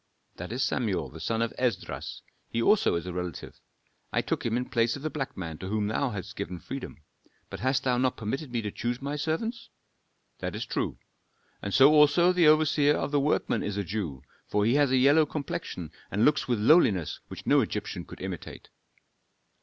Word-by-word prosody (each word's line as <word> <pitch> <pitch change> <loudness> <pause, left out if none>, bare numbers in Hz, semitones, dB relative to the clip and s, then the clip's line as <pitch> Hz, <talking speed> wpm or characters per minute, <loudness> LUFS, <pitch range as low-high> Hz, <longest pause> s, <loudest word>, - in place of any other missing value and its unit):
"That 90 +4 -6
is 125 +3 -1
Samuel 110 -7 -1
the 80 - -11
son 115 +7 0
of 115 - -3
Esdras; 120 -8 -2 0.3
he 115 - -2
also 200 - +4
is 85 - -3
a 90 - -5
relative. 90 -3 -6 0.5
I - - +1
took - - -2
him 115 0 0
in 125 - -1
place 115 -3 +1
of 140 - -9
the 155 - -2
black 135 -3 -4
man 80 -4 -5
to 95 - -6
whom 105 +1 0
thou 110 +6 0
hast 100 -6 -6
given 90 +1 -4
freedom. 125 - -8 0.5
But - - -6
hast 130 +1 +1
thou 125 -2 +1
not 130 0 +1
permitted 125 +6 -4
me 120 -2 -1
to 105 - -3
choose 120 +3 -3
my 140 +2 -3
servants?" 165 +11 -3 0.7
"That - - -4
is - - -3
true. - - -2 0.6
And 100 - -4
so 135 +7 +7
also 150 +4 +5
the 175 -3 +4
overseer 150 -1 +4
of - - -2
the 145 - +3
workmen 145 +2 +1
is 105 -1 -3
a 100 - 0
Jew, 85 -9 -4 0.2
for 105 0 +1
he 115 - +3
has 145 -1 +4
a 130 - +3
yellow 145 +4 +5
complexion 110 - -5 0.2
and 105 +3 +2
looks 150 - +3
with 120 -2 +1
a 105 - -3
lowliness 110 - +4
which - - -9
no - - +5
Egyptian - - -3
could - - -12
imitate." - - -7
125 Hz, 205 wpm, -28 LUFS, 100-145 Hz, 0.7 s, so